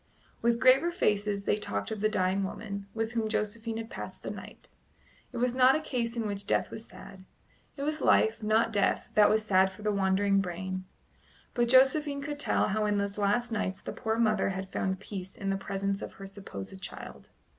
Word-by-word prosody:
With 235 0 +2
graver 260 +6 +5
faces 205 - 0
they - - +2
talked 100 - -3
of 215 -2 -4
the 215 - +3
dying 190 -1 +1
woman, 200 0 -5
with 225 0 -1
whom 225 -2 -1
Josephine 220 +1 -2
had 225 +1 -6
passed - - -7
the - - -3
night. - - -10 0.6
It 245 - -7
was 245 0 +1
not 255 +1 +6
a - - +1
case 240 -6 -2
in 230 - -1
which 200 -1 -3
death - - +1
was 220 - -7
sad; 190 -1 -12 0.5
it 280 - -4
was 305 +1 -1
life, 220 +1 +3
not 220 +1 +2
death, 205 - +1
that 210 -1 +6
was 215 0 +2
sad 190 -2 +4
for 190 +2 -13
the 210 - +1
wandering 195 0 +2
brain. 185 +1 -4 0.7
But 240 -1 +1
Josephine 280 +2 +4
could 290 0 -4
tell - - +1
how 210 +1 +1
in 205 0 +1
those 200 +1 -2
last 230 +4 +1
nights 190 -4 -2
the - - -6
poor 220 0 -1
mother 215 -4 +2
had 190 0 -5
found 190 -1 -1
peace 190 -2 -7
in 195 -1 -2
the - - +1
presence 195 0 -2
of - - -6
her 195 - -10
supposed 190 - -8
child. - - -8
210 Hz, 205 wpm, -29 LUFS, 195-230 Hz, 0.7 s, not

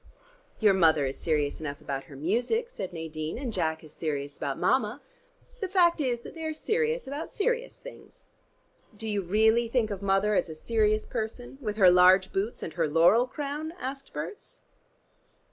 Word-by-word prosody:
"Your 210 -3 +5
mother 160 -6 +4
is 135 - -4
serious 150 -3 0
enough 145 -2 -5
about 135 -1 -5
her 140 - -13
music," 240 - 0
said 190 - -6
Nadine. 160 -2 -5
"And 250 -3 -4
Jack 160 -4 -1
is 155 -1 -13
serious 145 -3 -3
about 140 -1 -3
Mama. 235 0 +1 0.6
The 390 - -2
fact 350 -3 +3
is 245 -4 -1
that - - -10
they 325 - -8
are 315 -1 -2
serious 465 +7 0
about 285 +4 -5
serious 485 +3 -1
things." - - -13 0.7
"Do 225 - -6
you 205 -2 0
really 220 +5 +3
think 230 -2 0
of 200 -1 -4
Mother 200 +1 +2
as 190 - +1
a 160 - -7
serious 215 +4 +1
person 245 +4 -5
with 210 -4 -3
her 185 -4 +7
large 185 +1 +5
boots 200 +5 -2
and 160 - -5
her 165 -2 0
laurel 175 +11 +4
crown?" 295 +3 -4
asked 270 +1 -6
Berts. - - -7
215 Hz, 180 wpm, -28 LUFS, 165-275 Hz, 0.7 s, her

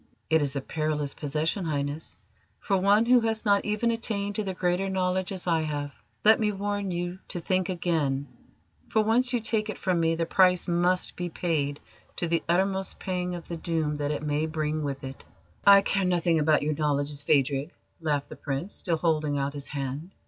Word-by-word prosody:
"It 160 -1 +5
is 140 -1 -1
a 140 - -1
perilous 150 -1 -2
possession, 155 +6 -2
Highness, 145 0 -3 0.4
for 200 - 0
one 200 +4 +4
who 250 +1 +6
has 225 -1 -1
not 200 -1 +4
even 210 +3 +1
attained 205 -3 -1
to 215 - -2
the 190 -2 -4
Greater 180 +2 0
Knowledge, 185 0 0
as 185 -2 -4
I 165 -2 +2
have. 145 -2 -3 0.3
Let 220 +1 +7
me 210 -1 +1
warn 205 0 -2
you 175 +1 -3
to 175 - -4
think 185 +2 0
again, 155 -6 0 0.6
for 220 - +3
once 235 +3 +2
you 245 - +1
take 220 -1 -1
it 215 - -4
from 180 -2 0
me 165 0 +2
the 165 0 -1
price 180 0 +3
must 175 +1 +1
be 175 0 -3
paid 150 -4 -1 0.4
to 175 - -2
the 165 0 +1
uttermost 190 +2 +1
pang 180 -1 -3
of 170 - -9
the 170 - -5
doom 160 -3 -1
that 145 -1 -2
it 150 0 -2
may 150 +1 0
bring 155 -1 -2
with 140 -2 -4
it." 135 0 -8 0.4
"I 200 0 +9
care 195 -1 +1
nothing 175 -2 +2
about 150 -1 +3
your 155 +1 0
knowledges, 145 -1 0
Phadrig," 140 0 +1 0.3
laughed 145 -3 -1
the - - -8
Prince, 145 +7 -4
still 170 -4 0
holding 155 -3 +1
out 140 0 -1
his 145 -1 -4
hand. 140 +5 -5
170 Hz, 200 wpm, -27 LUFS, 150-190 Hz, 0.6 s, I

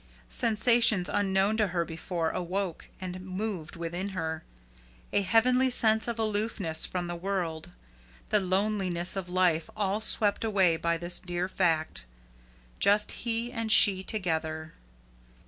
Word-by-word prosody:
Sensations 220 - +3
unknown 195 +1 +1
to 215 -2 +2
her 175 -2 -1
before, 165 0 -3
awoke 185 0 -4
and 185 -1 -6
moved 185 -3 -5
within 170 +3 -4
her, 160 -2 -3 0.7
a - - +3
heavenly 250 +6 +3
sense 220 -3 +2
of 235 -1 -3
aloofness 210 -6 0
from 180 -1 -3
the 175 0 -4
world, 170 -3 -3 0.6
the 210 - +3
loneliness 190 -2 0
of 190 -2 -5
life 180 -3 +1
all 205 0 -1
swept 210 -1 +1
away 190 -6 +3
by 170 +1 -1
this 175 +1 -2
dear 175 0 -3
fact 165 - -1 0.7
just 205 +1 +3
he 235 0 -1
and 230 -3 -3
she 200 -3 +7
together. 160 -6 -3
190 Hz, 130 wpm, -28 LUFS, 170-215 Hz, 0.7 s, she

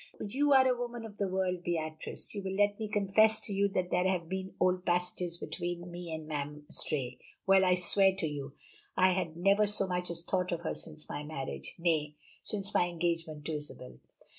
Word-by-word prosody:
"You 280 +8 +1
are 260 -1 +7
a 255 - +3
woman 240 -1 -5
of 210 -2 -10
the 200 - 0
world, 185 -1 -1
Beatrice; 155 -3 -3
you 205 - -3
will 190 0 -3
let 205 +1 +2
me 220 - -2
confess 215 +2 +5
to 205 - -3
you 200 +1 +3
that 180 0 0
there 180 +1 +3
had 180 -3 0
been 190 +1 -4
old 185 0 +2
passages 180 -1 -1
between 175 0 -4
me 175 -1 -7
and 160 -1 -5
Mme. 150 -1 -4
Istray 125 -4 -2 0.3
well, 190 0 +6
I 180 -1 +5
swear 190 +2 +5
to 190 -3 -1
you 145 -2 -5 0.4
I 185 0 +6
had 175 -3 -2
never 200 +4 +4
so 205 -1 +2
much 180 -1 -2
as 170 0 -1
thought 180 -1 0
of 170 -1 -2
her 165 - -2
since 155 -1 -9
my 145 - -4
marriage 135 - -5
nay, 155 -3 +1 0.3
since 200 -2 -4
my 175 - +3
engagement 165 -3 -2
to 160 - -2
Isabel. 65 - -10
180 Hz, 205 wpm, -31 LUFS, 160-195 Hz, 0.4 s, are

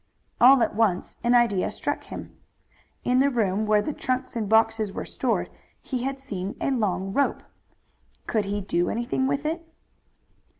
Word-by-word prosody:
All 255 0 +7
at - - -1
once 210 -5 0
an 240 +1 +4
idea 230 -6 +3
struck - - -3
him. - - -9 0.7
In 250 +1 +2
the 275 +1 +4
room 215 -4 0
where 210 -1 +3
the 300 - -3
trunks 255 -1 -2
and 215 -4 -2
boxes 225 -1 +3
were - - -5
stored - - -1 0.3
he 255 -2 -4
had 270 +2 -3
seen 200 -7 -5
a - - 0
long 195 -6 -1
rope. 280 +4 +1 0.8
Could 215 -3 0
he 205 +1 -2
do 175 -2 0
anything 240 +3 -1
with 280 +2 -1
it? 330 +2 -2
230 Hz, 165 wpm, -25 LUFS, 205-265 Hz, 0.8 s, All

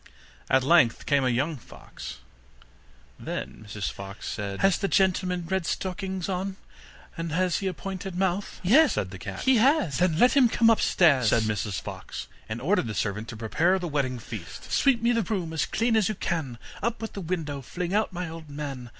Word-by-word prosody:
At 130 0 +4
length 140 -5 +4
came 140 -2 +3
a 130 - +2
young 140 +6 0
fox. 70 - -10 1.0
Then - - -5
Mrs 105 -1 -3
Fox 100 +1 -8
said: 100 -2 -4
'Has 195 -1 +4
the 195 - 0
gentleman 185 -2 +1
red 190 -1 -1
stockings 190 -1 -3
on, 190 0 -2 0.6
and 165 -1 -4
has 180 +3 +1
a - - -3
little 190 - -3
pointed 190 -1 -5
mouth?' 190 +1 -1
'Yes,' 270 - +6
said 95 -3 -2
the 95 - -8
cat, - - -6
'he 260 -1 +4
has.' 250 - +3
'Then 175 -3 +2
let 245 +7 +5
him 260 -4 +6
come 230 0 +4
upstairs,' 150 - +4
said 115 0 +3
Mrs 105 -2 -1
Fox, - - -7 0.2
and 110 +2 -3
ordered 160 - +1
the 110 - -4
servant 105 +3 -2
to 115 - -7
prepare 160 - +2
the 180 -2 -3
wedding 140 -5 -1
feast. 110 -6 -8
'Sweep 255 -5 +3
me 235 - +4
the 230 -1 +2
room 180 -6 -2
as 160 - 0
clean 230 0 +1
as 220 -3 +3
you 215 - -2
can, 155 -10 -3 0.2
Up 235 +2 -1
with 225 0 -6
the 200 - -5
window, 160 -5 -3
fling 175 +7 -4
out 215 +1 +1
my 180 0 -4
old 160 -1 -9
man! 140 -4 -6
170 Hz, 200 wpm, -27 LUFS, 125-195 Hz, 1.0 s, Yes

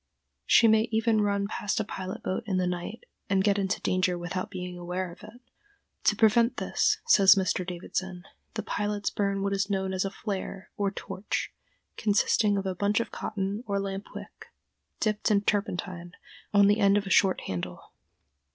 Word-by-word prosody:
She 230 - +6
may 220 0 +4
even 225 -1 +2
run 200 -1 +1
past 205 0 -2
a - - +1
pilot 190 -2 -6
boat 185 - -2
in 190 -3 0
the 185 - +1
night 180 +5 -4 0.3
and 195 -1 +2
get 200 0 +2
into 195 0 -1
danger 185 -1 +1
without 175 +2 -4
being 180 -1 -6
aware 180 +1 -4
of - - -14
it. 215 +3 -12 0.7
To - - +4
prevent 230 +2 +4
this, 430 -1 +1
says 200 - +7
Mr. 185 -1 0
Davidson, 180 0 -5 0.3
the - - -3
pilots 205 0 -2
burn 200 -1 -1
what 200 0 0
is 195 +1 0
known 190 -1 -1
as 185 - 0
a 195 - -2
"flare" 195 -1 -5
or 200 -1 0
torch, 195 0 -4 0.4
consisting 205 0 +2
of 195 - -2
a 190 - -1
bunch 205 +3 +1
of 230 - -3
cotton 200 +2 -3
or 200 -1 0
lamp 195 0 -4
wick - - -10 0.5
dipped 215 +1 0
in 205 -2 +3
turpentine, 185 -4 -2 0.4
on 205 -1 +6
the 205 +2 +4
end 200 -1 +5
of 205 - -1
a 190 - -5
short 190 -1 +4
handle. 90 -2 -6
200 Hz, 180 wpm, -28 LUFS, 185-210 Hz, 0.7 s, says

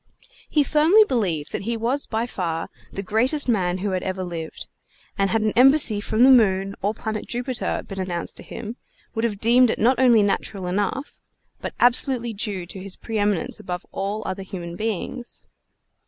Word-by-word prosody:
He 300 - +3
firmly 320 +9 +5
believed 185 - -1
that - - -3
he 230 +3 -2
was 245 +6 -1
by 225 +1 -1
far 170 -8 -3 0.2
the 195 - -5
greatest 250 +9 +1
man 185 -6 +1
who 195 +1 -2
had 185 -1 -1
ever 190 0 -3
lived; 165 -3 -6 0.5
and 195 -1 +1
had 220 +3 +1
an 215 - +2
embassy 255 -4 +5
from 220 +3 +2
the 265 - +8
moon 195 -5 +4
or 205 +2 0
the - - -17
planet 215 -1 -3
Jupiter 245 +1 -2
been 195 -1 -6
announced 175 -2 -3
to - - -8
him, 230 +2 -7 0.4
would 225 -1 -2
have 210 -4 -2
deemed 240 +3 +5
it - - 0
not 245 +3 +3
only 240 -5 +6
natural 195 -1 -1
enough, 205 +9 -2 0.4
but - - -5
absolutely 245 -1 +2
due 200 -4 -3
to 190 - -9
his 195 0 -5
preëminence 205 -4 -1
above 180 0 -5
all 205 +2 -3
other 190 +1 -3
human 175 -3 -7
beings. 225 +4 -4
215 Hz, 185 wpm, -23 LUFS, 190-240 Hz, 0.5 s, the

